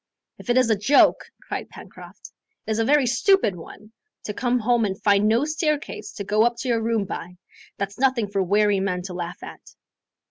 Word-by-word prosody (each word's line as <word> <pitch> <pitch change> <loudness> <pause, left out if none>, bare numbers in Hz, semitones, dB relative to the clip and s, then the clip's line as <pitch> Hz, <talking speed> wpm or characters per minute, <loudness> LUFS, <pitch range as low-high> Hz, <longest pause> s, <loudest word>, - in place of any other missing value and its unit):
"If - - -12
it 240 - +3
is 250 -3 +3
a - - +4
joke," 215 +8 +3
cried - - -6
Pencroft, - - -13 0.3
"it - - -4
is 215 - -1
a - - +2
very 285 +3 +3
stupid 245 - +2
one! 210 +5 -13 0.3
To 210 - -5
come 245 +3 0
home 240 0 +1
and 195 -2 -2
find 205 0 +3
no 230 +6 +2
staircase 305 +4 -3
to 200 - -6
go 210 +2 +1
up 240 0 +1
to - - -5
your 230 -2 +1
room 225 -2 0
by 180 -1 -7 0.4
that's 200 +3 -5
nothing 260 -5 +1
for 195 0 -1
weary 205 +2 +2
men 180 -2 -2
to 185 0 -7
laugh 175 +1 -6
at." - - -12
220 Hz, 205 wpm, -23 LUFS, 200-245 Hz, 0.4 s, a